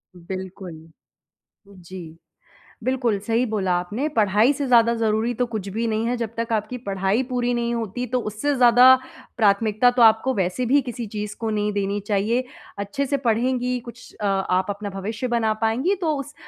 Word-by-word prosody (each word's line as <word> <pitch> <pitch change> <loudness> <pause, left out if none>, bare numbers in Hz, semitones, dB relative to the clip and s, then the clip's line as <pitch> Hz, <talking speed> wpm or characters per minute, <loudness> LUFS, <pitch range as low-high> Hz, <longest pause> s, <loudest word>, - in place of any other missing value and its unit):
बिल्कुल। 185 0 -7 1.0
उ, 200 - -16
जी। 175 -2 -10 0.7
बिल्कुल 245 -5 0
सही 230 +2 +2
बोला 200 -5 -1
आपने 210 +12 -3
पढ़ाई 215 +4 +4
से 280 -1 -3
ज़्यादा 235 -2 +4
ज़रूरी 220 +1 +1
तो 245 +2 0
कुछ 215 -4 -5
भी 225 +4 -2
नहीं 220 +1 -1
है 245 +1 0
जब 230 -2 -3
तक 230 0 -3
आपकी 215 +3 -1
पढ़ाई 195 +4 0
पूरी 245 -1 0
नहीं 235 0 -1
होती, 230 +2 -3
तो 250 +2 -1
उससे 225 +7 -2
ज़्यादा 245 0 +7 0.5
प्राथमिकता 215 +2 +3
तो 245 0 +2
आपको 225 +4 +5
वैसे 190 +5 -1
भी 280 +4 +4
किसी 245 -2 -6
चीज़ 210 0 -5
को 225 -1 -1
नहीं 210 -1 -1
देनी 200 0 -1
चाहिए। 220 +5 +1 0.3
अच्छे 200 +8 -2
से 280 - 0
पढ़ेंगी 250 +2 +1
कुछ 235 0 -13
अ, 210 - -1
आप 190 -1 +1
अपना 205 0 -5
भविष्य 215 +6 -4
बना 230 -2 +1
पाएँगी 255 - +1
तो 320 -4 +1
उस 290 +2 -7
225 Hz, 180 wpm, -23 LUFS, 200-245 Hz, 1.0 s, ज़्यादा